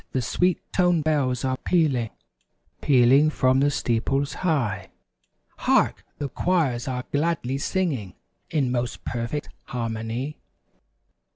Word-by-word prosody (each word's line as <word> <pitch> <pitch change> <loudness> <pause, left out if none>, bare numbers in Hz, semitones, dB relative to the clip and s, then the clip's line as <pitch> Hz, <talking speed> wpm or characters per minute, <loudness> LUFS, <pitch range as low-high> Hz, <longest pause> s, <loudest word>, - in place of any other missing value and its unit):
The 130 - +1
sweet 180 +8 +1 0.2
toned 175 -4 +3
bells 135 -5 +1
are 130 0 0
pealing; 140 -11 +1 0.7
Pealing 135 +3 +5
from 130 -3 +2
the 145 +1 +4
steeples 135 +2 0
high. 120 - 0 0.7
Hark! - - +2
The 145 - -2
choirs 140 -7 0
are 125 -1 -3
gladly 140 -3 0
singing 145 - -1 0.3
In 140 -5 +1
most 120 -1 -2
perfect 120 +5 -3 0.2
harmony. 115 +4 -3
135 Hz, 110 wpm, -25 LUFS, 120-155 Hz, 0.7 s, Pealing